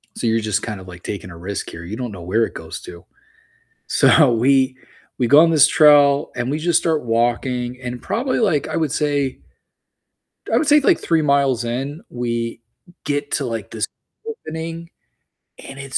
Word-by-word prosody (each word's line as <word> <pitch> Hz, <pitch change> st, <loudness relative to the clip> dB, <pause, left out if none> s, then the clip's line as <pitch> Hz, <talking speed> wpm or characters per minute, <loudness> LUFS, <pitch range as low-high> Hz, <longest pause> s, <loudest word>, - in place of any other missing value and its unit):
So -, -, -3 dB
you're 115 Hz, 0 st, +2 dB
just 105 Hz, -2 st, -1 dB
kind 105 Hz, -4 st, -5 dB
of 95 Hz, -, -13 dB
like 90 Hz, -1 st, -11 dB
taking 95 Hz, -2 st, -6 dB
a 85 Hz, -, -11 dB
risk 95 Hz, +3 st, -5 dB
here, 85 Hz, +1 st, -9 dB
you 105 Hz, +5 st, -6 dB
don't 125 Hz, -3 st, -5 dB
know 90 Hz, -3 st, -9 dB
where 110 Hz, +7 st, +1 dB
it -, -, -7 dB
goes 80 Hz, 0 st, -8 dB
to. 85 Hz, -1 st, -11 dB, 0.8 s
So 145 Hz, -6 st, +4 dB
we 130 Hz, +2 st, +2 dB, 0.4 s
we 125 Hz, -, +1 dB
go 145 Hz, +5 st, +7 dB
on 165 Hz, 0 st, +5 dB
this 150 Hz, -3 st, +6 dB
trail 145 Hz, -2 st, +5 dB
and 120 Hz, +2 st, -2 dB
we 150 Hz, -, -1 dB
just 170 Hz, +1 st, +2 dB
start 160 Hz, -5 st, -1 dB
walking 120 Hz, +2 st, -1 dB
and 125 Hz, 0 st, -5 dB
probably 255 Hz, +3 st, -1 dB
like 175 Hz, -, +1 dB
I -, -, -3 dB
would 160 Hz, -4 st, 0 dB
say 145 Hz, -3 st, -1 dB, 1.1 s
I -, -, +2 dB
would 310 Hz, -, +2 dB
say, 295 Hz, 0 st, +6 dB
like, 340 Hz, +5 st, +3 dB
3 165 Hz, -1 st, +1 dB
miles 140 Hz, -4 st, +2 dB
in, 135 Hz, +7 st, -4 dB
we 115 Hz, -1 st, -4 dB, 0.4 s
get 145 Hz, 0 st, -2 dB
to, 140 Hz, -, 0 dB
like, 115 Hz, -4 st, -5 dB
this 110 Hz, -1 st, -3 dB, 0.4 s
opening 165 Hz, -, -6 dB, 0.8 s
and 135 Hz, -, -10 dB
it's 135 Hz, -1 st, -3 dB
130 Hz, 190 wpm, -20 LUFS, 115-150 Hz, 1.1 s, go